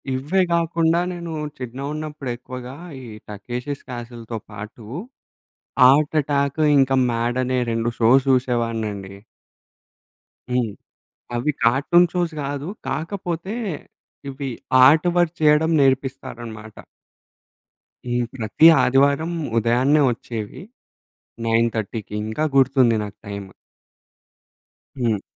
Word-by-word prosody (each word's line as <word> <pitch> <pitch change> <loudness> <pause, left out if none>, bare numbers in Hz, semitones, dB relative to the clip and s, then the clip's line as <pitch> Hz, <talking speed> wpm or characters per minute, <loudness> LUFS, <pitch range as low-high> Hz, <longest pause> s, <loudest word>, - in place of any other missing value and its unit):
ఇవ్వే 150 +9 +1
గాకుండా 165 0 +2
నేను 170 -1 -6 0.3
చిన్నగున్నప్పుడు 140 +3 -5
ఎక్కువగా 125 +1 -8 0.3
ఈ - - -10 0.2
'టకేషిష్ 120 +7 -6
క్యాసిల్‌తో' 120 -2 -7
పాటు 105 +2 -9 1.0
'ఆర్ట్ 150 +3 +3
అటాక్' 140 +1 -1 0.2
ఇంక 135 -1 +3 0.2
'మ్యాడ్' 120 +1 -1
అనే 130 0 0
2 115 +1 -1
షోస్ 125 +4 +5
చూసేవాడ్నండి. 115 -6 -1 1.4
హ్మ్. 125 -4 0 0.6
అవి 125 +6 0
'కార్టూన్ 140 +9 +4
షోస్' 175 -3 -1
కాదు 140 +2 -4 0.2
కాకపోతే 175 +2 -3 0.7
ఇవి 135 0 -5 0.4
ఆర్ట్‌వర్క్ 175 +3 +3
చేయడం 155 +1 +4
నేర్పిస్తారన్నమాట. 130 -5 -2 1.3
ఈ - - 0 0.2
ప్రతి 115 +5 +3 0.2
ఆదివారం 140 +5 +2 0.3
ఉదయాన్నే 125 +6 +3
వచ్చేవి. 115 0 -7 0.8
9:30కి 115 -2 -1
ఇంకా 110 +8 -2
గుర్తుంది 130 -3 +4
నాకు 105 0 -9
టైమ్. 100 -1 -6 1.5
హ్మ్. 110 -5 +1
130 Hz, 90 wpm, -22 LUFS, 115-150 Hz, 1.5 s, షోస్